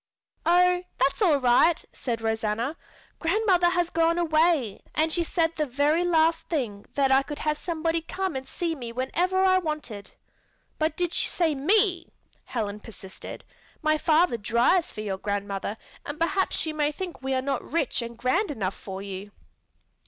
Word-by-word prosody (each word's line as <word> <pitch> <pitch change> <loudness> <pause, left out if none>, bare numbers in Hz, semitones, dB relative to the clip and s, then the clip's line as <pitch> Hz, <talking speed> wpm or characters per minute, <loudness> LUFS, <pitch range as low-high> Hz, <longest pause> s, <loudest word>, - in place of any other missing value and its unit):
"Oh, 360 +1 +4 0.2
that's 270 - +1
all 335 -8 +5
right!" 270 +6 +3
said 230 -3 -3
Rosanna. 225 +5 -1 0.4
"Grandmother 360 0 +3
has 350 -1 0
gone 330 +1 +2
away, 315 - +2
and 315 +1 +2
she 345 - +2
said 330 0 0
the 305 -1 -1
very 290 +6 +2
last 325 -1 +2
thing 230 -11 -3
that 275 -1 +2
I 265 +1 +6
could 290 +2 -7
have 305 -1 0
somebody 330 0 -1
come 380 +1 -3
and 265 0 -5
see 340 -2 -2
me 245 -6 -6
whenever 355 +10 0
I 370 0 +5
wanted." 300 - -5 0.7
"But 310 0 0
did 350 -1 0
she - - +2
say 330 -3 +1
me?" 355 +4 +2 0.4
Helen 210 -4 -3
persisted. 195 -3 -10 0.4
"My 310 0 +2
father 315 -5 +3
drives 235 - +2
for 215 - -6
your 195 -3 -3
grandmother 200 +1 -3 0.3
and 290 +1 -6
perhaps 380 +3 +1
she 315 - -1
may 300 -1 +1
think 355 +1 -6
we 265 0 -1
are 260 - +1
not 275 0 -1
rich 300 -5 -1
and 235 0 -7
grand 345 - +1
enough 195 -9 -2
for 195 0 -7
you." 200 0 -7
305 Hz, 165 wpm, -26 LUFS, 235-340 Hz, 0.7 s, I